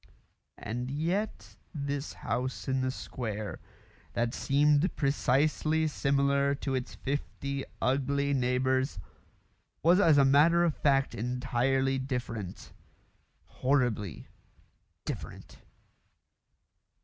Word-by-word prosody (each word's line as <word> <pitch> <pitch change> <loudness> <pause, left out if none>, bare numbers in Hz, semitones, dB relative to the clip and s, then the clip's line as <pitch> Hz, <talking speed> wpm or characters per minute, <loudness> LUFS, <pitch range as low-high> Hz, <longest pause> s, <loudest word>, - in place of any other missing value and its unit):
And 120 +3 -4
yet 170 +9 -2 0.2
this 140 0 -3
house 125 +2 -3
in 130 0 +1
the 130 - 0
square, 110 -5 -5 0.5
that 120 0 0
seemed 145 +4 +2
precisely 150 +3 +1
similar 140 -1 +2
to 140 -1 -3
its 130 -1 -3
fifty 140 0 -3
ugly 140 +2 +1
neighbours, 130 0 +1 0.9
was 175 +4 +5
as 160 -7 +5
a 140 - +6
matter 155 +6 +5
of 165 -3 +1
fact 135 -2 +2
entirely 130 +3 0
different 120 -7 -5 0.7
horribly 120 - -1 0.8
different. - - -7
135 Hz, 90 wpm, -30 LUFS, 125-145 Hz, 0.9 s, a